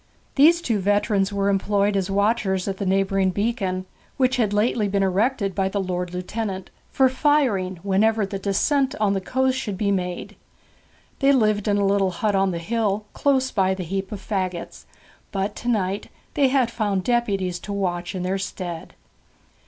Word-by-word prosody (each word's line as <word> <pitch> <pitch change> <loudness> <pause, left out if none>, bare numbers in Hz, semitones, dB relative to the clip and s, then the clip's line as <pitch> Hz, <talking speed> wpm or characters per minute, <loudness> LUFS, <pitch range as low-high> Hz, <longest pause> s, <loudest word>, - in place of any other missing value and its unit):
These 335 +5 +5
two 225 -4 0
veterans 205 0 +1
were 200 0 0
employed 200 +1 +1
as 195 -1 0
watchers 200 -2 +1
at 195 -1 -2
the 195 - -3
neighbouring 195 0 +2
beacon, 195 -2 -1 0.3
which 260 0 +2
had 220 -4 +1
lately 210 +1 +1
been 200 0 +1
erected 200 +2 +1
by 190 0 0
the 200 - -2
Lord 180 -2 -2
Lieutenant 190 +1 -4 0.2
for 265 - +4
firing 255 -9 +1
whenever 210 +2 +2
the 195 0 -5
descent 270 +8 +1
on 205 -2 +2
the 195 - -1
coast 260 +5 0
should 205 -7 -4
be 200 0 +1
made. 180 -2 -3 0.8
They 275 0 +4
lived 215 -6 +2
in 205 -1 +2
a 200 - +2
little 195 -1 +2
hut 205 +4 -1
on 195 0 +2
the 175 - -2
hill, 210 +3 -1
close 265 -2 +1
by 190 -2 +1
the 185 - -5
heap 190 +2 -4
of 210 - -5
faggots; 185 -4 -4 0.5
but 200 +1 -2
to 240 - -7
night 200 -4 0 0.2
they 280 -2 +3
had 260 -3 +2
found 205 -5 -1
deputies 195 -7 0
to 205 - -8
watch 180 -2 -2
in 180 - -3
their 190 +2 -1
stead. 175 -3 -6
200 Hz, 175 wpm, -23 LUFS, 190-225 Hz, 0.8 s, These